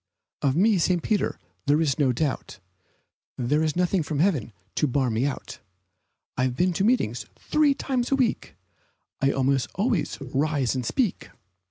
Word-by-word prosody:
Of 135 -1 +2
me, 200 +3 +4
St. 175 0 +1
Peter, 210 -3 0 0.3
there 145 +2 +4
is 155 -4 +1
no 135 -3 +4
doubt 135 +3 -2 0.8
There 135 +5 +1
is 155 -1 0
nothing 180 +1 +2
from 150 -1 -3
heaven 150 - +1 0.2
to 150 - +1
bar 130 -1 +1
me 115 +5 +1
out; 140 - -6 0.8
I 130 - +1
have 125 -1 -1
been 180 +6 +2
to 190 - 0
meetings 205 - +1
three 300 -2 +2
times 250 -3 -1
a - - +5
week, 255 -4 -1 0.7
And 135 0 +3
almost 135 -1 +1
always 210 -1 0
I'd 135 -2 -9
rise 140 -3 +1
and 130 -1 -2
speak. 220 - -1
155 Hz, 170 wpm, -25 LUFS, 135-195 Hz, 0.8 s, a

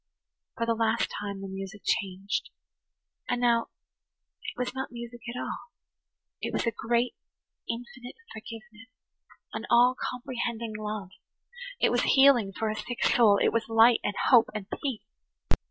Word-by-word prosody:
For 230 - 0
the 230 - +2
last 225 0 +1
time 200 -1 -5
the 195 - -5
music 195 +2 -7
changed. 195 +4 -1 0.8
And 245 - +1
now 235 -1 +3 0.7
it - - -7
was 250 0 -2
not 265 0 -4
music 235 0 -8
at 245 +1 -4
all–it - - -9
was - - -1
a 230 - +2
great, 235 +2 0 0.6
infinite 245 +1 -6 0.2
forgiveness, 225 +1 -10 0.6
an - - -5
all 245 +2 +6 0.2
comprehending 235 -3 -4
love. 210 -3 -4 0.7
It - - +3
was - - +2 0.2
healing 265 -7 +6
for 215 +3 -2
a - - -3
sick 245 +2 -4
soul; 215 -4 +5
it - - +3
was 230 0 0
light 225 +1 +6
and 205 - -1 0.2
hope 240 -3 +7
and 210 -2 -4 0.2
peace. 265 -7 -3
230 Hz, 145 wpm, -28 LUFS, 215-245 Hz, 0.8 s, hope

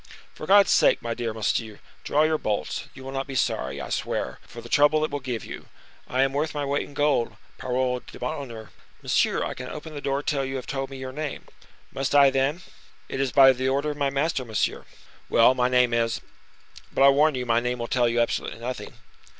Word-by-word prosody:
"For - - -9
God's 200 0 +6
sake, - - +4
my 115 0 -2
dear 115 -1 -3
monsieur, 110 0 -2 0.2
draw 150 - +2
your 155 0 +1
bolts; 105 -1 -2
you 135 - -10
will 135 - -7
not 135 0 -3
be 135 - -6
sorry, 70 - -1
I - - -6
swear, 65 - -3
for 120 - -10
the 115 - -10
trouble 150 +4 +4
it - - -6
will 145 - -2
give 125 -4 -4
you. - - -9 0.4
I 130 +1 +2
am 135 0 0
worth 150 +2 -1
my 145 -1 -1
weight 140 +1 -1
in 145 - -15
gold, 135 -7 +1 0.2
parole 125 0 -1
d'honneur!" 125 -7 -7 0.3
"Monsieur, - - +1
I - - -3
cannot 125 0 -7
open 155 +1 -8
the 145 - -6
door 140 +1 -1
till 140 -2 0
you 135 0 -4
have 130 - -5
told 135 -1 -3
me 135 - -8
your 130 0 -6
name." 150 +1 -5 0.5
"Must 135 +1 -1
I, 140 -1 +7
then?" 135 +6 0 0.5
"It 135 - -4
is 135 -2 0
by 135 0 +7
the 130 +1 -1
order 140 +3 0
of 145 - -8
my 140 -1 +1
master, 140 +1 -1
monsieur." 110 -3 -2 0.4
"Well, 115 +2 +6
my 125 -1 +1
name 125 -1 +3
is—but, 115 +3 -4
I 140 - +9
warn 150 +2 +4
you, 125 -1 -3
my 115 -1 +3
name 125 +1 -2
will 120 - -3
tell 120 0 +2
you 120 0 +1
absolutely 115 -1 -2
nothing." 125 +2 -6
135 Hz, 220 wpm, -25 LUFS, 120-145 Hz, 0.5 s, I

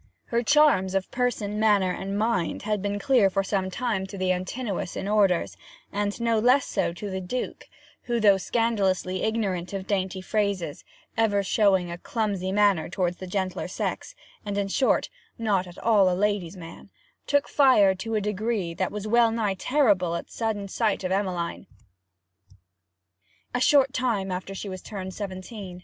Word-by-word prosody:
Her 235 0 0
charms 230 -8 +4
of 190 -1 -1
person, 225 -4 -1
manner, 205 -4 +3
and 195 +2 -4
mind, 215 -5 0
had 210 -1 -1
been 205 +1 -2
clear 215 -1 +3
for 195 +1 0
some 190 -1 -1
time 200 -2 -2
to 195 - -8
the 185 -1 +1
Antinous 185 +2 -3
in 195 - -4
orders, 200 -4 +2 0.4
and 205 +1 -2
no 230 -1 +2
less 250 +4 +4
so - - -1
to 200 +3 -6
the 190 0 -3
Duke, 245 +8 -5 0.4
who, 240 -1 0
though 205 -3 +5
scandalously 190 -4 0
ignorant 200 -5 -1
of 195 -1 -4
dainty 190 -2 -1
phrases, 190 -5 -2 0.3
ever 205 -3 +2
showing 190 -3 +2
a 170 - -6
clumsy 200 -5 -2
manner 200 -4 +3
towards 175 -1 -1
the 185 - -8
gentler 190 0 -2
sex, - - -4 0.3
and, 205 -1 -3
in 200 -1 -1
short, 260 - +2 0.3
not 200 -5 0
at 175 - -12
all 205 -5 +4
a 180 - -1
lady's 205 -3 -1
man, 165 -2 -11 0.4
took 285 -1 +2
fire 255 -9 +5
to 220 +4 -4
a 215 - +1
degree 210 -3 -2
that 185 +2 -2
was 210 0 -5
wellnigh 225 -2 +3
terrible 195 - +2
at - - -6
sudden 215 -3 -2
sight 210 0 0
of 185 - -2
Emmeline, 185 -2 -2 1.9
a 245 - 0
short 275 -1 +4
time 225 -8 -1
after 185 +2 -5
she 200 - -6
was 185 -2 -6
turned 190 -3 -6
seventeen. 190 -1 -7
200 Hz, 165 wpm, -26 LUFS, 185-220 Hz, 1.9 s, though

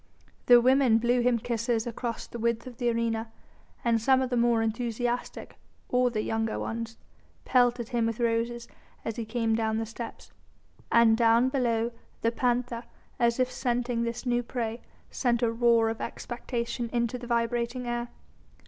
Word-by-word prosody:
The 245 -1 +9
women 255 -1 +4
blew 240 +2 +2
him 245 0 +3
kisses 230 0 -1
across 235 0 -4
the 235 - -8
width 235 0 0
of 250 -2 -9
the 245 -2 +1
arena, 230 -1 -1 0.5
and 230 -1 +3
some 260 +3 +4
of 255 - -4
the - - +1
more 235 -1 +3
enthusiastic 240 +2 -3 0.3
or 250 0 +3
the 215 -3 -2
younger 225 0 -1
ones 230 0 -4 0.5
pelted 245 -2 +2
him 235 -2 +1
with 230 0 -3
roses 235 0 0 0.4
as 225 - -3
he 230 - -3
came 225 0 0
down 220 -1 0
the 225 - -1
steps. 225 +1 -8 0.6
And 230 -1 +6
down 230 +2 +4
below 235 -3 0 0.3
the 230 - +2
panther, 245 -1 -1 0.3
as 235 0 +2
if 255 0 +2
scenting 245 -2 -1
this 235 +2 -3
new 240 -1 +2
prey, 235 -1 -4 0.3
sent 240 -2 0
a 230 - +3
roar 230 -1 +3
of 225 0 -3
expectation 240 -1 -4
into 240 0 -1
the 240 - -8
vibrating 235 +1 -1
air. 240 0 -2
235 Hz, 165 wpm, -28 LUFS, 230-245 Hz, 0.6 s, The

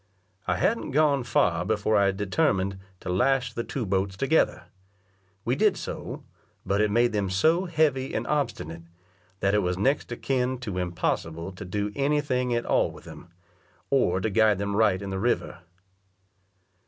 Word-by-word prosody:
I 90 - +2
hadn't 215 - 0
gone 145 -3 +3
far 105 -7 +2
before 110 0 0
I 100 -1 +4
determined 95 -1 0 0.2
to - - -6
lash 125 +6 +1
the 115 - -3
two 125 -1 -4
boats 95 0 -1
together; 145 +8 +2 0.8
we - - +1
did - - +3
so, - - -6 0.4
but 100 +1 +1
it 105 - +2
made 120 +3 +3
them 100 -2 0
so 160 - +2
heavy 150 -6 +1
and - - -1
obstinate, 115 - -2 0.6
that 95 +1 +2
it 105 - +4
was 90 -2 -1
next 135 +6 0
akin 130 +1 -1
to 100 -7 -3
impossible 85 -1 -2
to 95 +1 -9
do 105 +3 -2
any 145 +2 +2
thing 125 -4 -1
at 120 - -1
all - - +2
with - - -13
them, - - -11 0.6
or 110 -10 +3
to 105 +3 -1
guide 110 -1 +4
them 100 0 -2
right 100 -3 +2
in 100 - -5
the 95 - -2
river. 120 -1 -1
105 Hz, 165 wpm, -26 LUFS, 95-130 Hz, 0.8 s, I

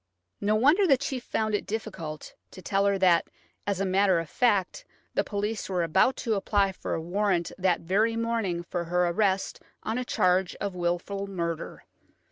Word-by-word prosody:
No 210 +1 +1
wonder 300 - +4
the 275 -4 +5
chief 265 -2 -4
found 215 -2 -1
it 205 - -1
difficult 190 -9 -5 0.2
to 185 - -12
tell 195 +2 +1
her 200 0 +2
that, 180 -3 +4 0.4
as 200 -2 0
a 195 - +1
matter 190 -1 +3
of 165 -2 -6
fact, 220 - +1 0.3
the - - +1
police 210 +1 -3
were 180 -2 0
about 165 +10 +3
to 225 - +2
apply 200 -1 +1
for 190 - -4
a - - -2
warrant 175 +1 0
that 185 -2 +2
very 210 +7 +1
morning 225 -7 -1
for 175 0 -4
her 180 +1 +1
arrest 190 +1 0 0.2
on 225 +3 -2
a - - -1
charge 185 -5 +1
of 200 -2 -4
wilful 180 +3 -2
murder 170 -4 -4
195 Hz, 180 wpm, -27 LUFS, 175-215 Hz, 0.4 s, the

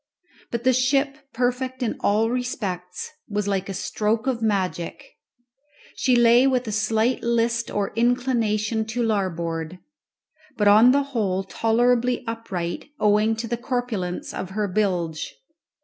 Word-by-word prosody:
But 235 0 -3
the 255 +1 +4
ship, 270 +2 +2 0.2
perfect 250 +1 -1
in 230 - -1
all 220 +3 +2
respects, 195 -8 -4 0.2
was 205 -1 -2
like 195 -1 -1
a - - -3
stroke 220 +4 -1
of 255 -4 -1
magic. 195 +2 -1 0.9
She 255 -2 +2
lay 240 +2 +6
with 255 -2 +1
a - - -2
slight 220 +3 +1
list 235 0 0
or 205 -1 -2
inclination 230 -3 +1
to 235 +2 -2
larboard, 170 -5 -2 0.8
but 210 - +2
on 215 +5 +7
the 280 +1 +3
whole 195 -5 0
tolerably 240 +4 +1
upright, 195 -7 -4
owing 210 +1 +3
to 225 +1 -4
the 235 +1 -2
corpulence 240 -8 -3
of 185 - -5
her 210 -1 +1
bilge. 180 -5 -1
225 Hz, 135 wpm, -24 LUFS, 200-245 Hz, 0.9 s, on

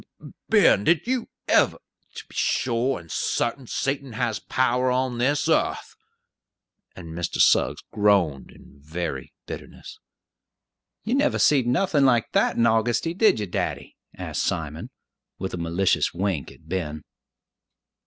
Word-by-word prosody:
Ben, 200 - +5
did 165 +3 +2
you 250 -1 -2 0.2
ever? - - +3 0.4
To - - -8
be - - -18
sure 125 +1 0
and 85 -1 -14
sartain, 125 +2 -1
Satan 135 -1 -2
has 115 -1 -1
power 130 0 +1
on 125 -1 -1
this 145 +5 +1
yearth!" 160 - 0 1.0
and 85 -3 -10
Mr. 85 0 -3
Suggs - - +3
groaned 100 -10 +2
in 70 - -18
very 75 -2 -5
bitterness. - - -9 1.0
"You 225 - -2
never 285 +2 +2
seed 135 -5 +3
nothin' 145 +3 +2
like 120 -4 +3
that - - +2
in 115 - +2
Augusty, 115 +7 +1
did 215 - +4
ye, 105 - -2
daddy?" 90 - -4 0.2
asked - - -3
Simon, 80 -2 -3 0.5
with 95 - -5
a - - -3
malicious 85 +2 0
wink 90 -5 -2
at - - -19
Ben. 80 -4 -4
115 Hz, 135 wpm, -24 LUFS, 90-135 Hz, 1.0 s, Ben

